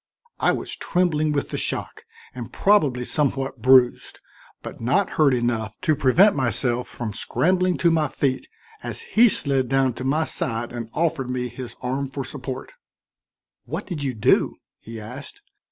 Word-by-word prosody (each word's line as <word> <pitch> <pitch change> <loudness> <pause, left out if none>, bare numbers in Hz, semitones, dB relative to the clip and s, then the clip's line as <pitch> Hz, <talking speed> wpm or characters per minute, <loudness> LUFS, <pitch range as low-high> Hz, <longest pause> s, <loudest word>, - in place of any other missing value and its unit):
I - - +3
was - - -3
trembling 155 -4 0
with 140 -1 -1
the - - -3
shock - - -3 0.3
and 120 -3 -7
probably 150 -12 +2
somewhat 135 0 -1
bruised, 130 -1 +4 0.4
but - - -8
not 180 +12 +1
hurt 150 -3 +3
enough 120 -3 -1
to 155 - +2
prevent 160 +9 +4
myself 125 -1 0
from 115 -4 -6
scrambling 180 - +1
to 170 - +3
my 160 -2 +2
feet, 135 -1 -2 0.3
as - - -5
he 235 +2 +4
slid 135 -8 +2
down 135 -1 +2
to 130 - -7
my 145 +5 +1
side 120 -4 -2
and 115 -2 -6
offered 155 -6 -1
me 125 -1 -2
his 120 0 -8
arm 135 +2 -2
for 135 0 -5
support. 130 - -7 0.9
"What - - -5
did 170 -6 -5
you 135 -3 -2
do?" 105 - +2 0.2
he 115 0 -9
asked. 130 - -10
135 Hz, 160 wpm, -23 LUFS, 125-155 Hz, 0.9 s, bruised